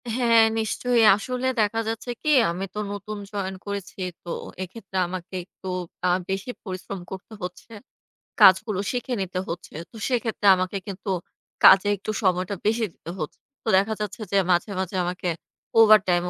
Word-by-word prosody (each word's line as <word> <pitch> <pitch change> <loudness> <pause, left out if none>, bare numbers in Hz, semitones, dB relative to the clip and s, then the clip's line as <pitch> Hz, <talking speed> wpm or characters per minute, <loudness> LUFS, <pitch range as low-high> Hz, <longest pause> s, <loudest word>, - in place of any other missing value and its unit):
হ্যাঁ, 230 -2 +5 0.2
নিশ্চয়ই। 235 +2 +1
আসলে 250 +4 -3
দেখা 215 +2 +2
যাচ্ছে 225 +2 -4
কি 305 - 0 0.2
আমি 185 +3 -3
তো 210 - -4
নতুন 205 +1 -6
জয়েন 190 -2 -3
করেছি। 200 -1 -6 0.2
তো 175 - -9 0.3
এক্ষেত্রে 190 0 -8
আমাকে 185 +1 -6
একটু 190 - -13 0.4
আ - - +4 0.2
বেশি 195 +6 -2
পরিশ্রম 185 0 -6
করতে 190 +3 -8
হচ্ছে। 180 +5 -7 0.7
কাজগুলো 190 +1 +6
শিখে 250 0 -3
নিতে 185 -1 -3
হচ্ছে। 170 +1 -6 0.2
তো - - -17
সেক্ষেত্রে 225 -4 0
আমাকে 185 +2 -2
কিন্তু 195 +1 -6 0.5
কাজে 195 +1 +8
একটু 215 - -4
সময়টা 185 +1 +1
বেশি 225 +1 +2
দিতে 170 - -9
হচ্ছে। 155 - -5 0.2
তো - - -12
দেখা 200 +3 +2
যাচ্ছে 210 +2 -4
যে 200 - +3
মাঝে, 175 +4 +2
মাঝে 190 +1 -3
আমাকে 180 +1 -3 0.5
ওভারটাইম 195 -5 +6
200 Hz, 155 wpm, -25 LUFS, 185-225 Hz, 0.7 s, কাজে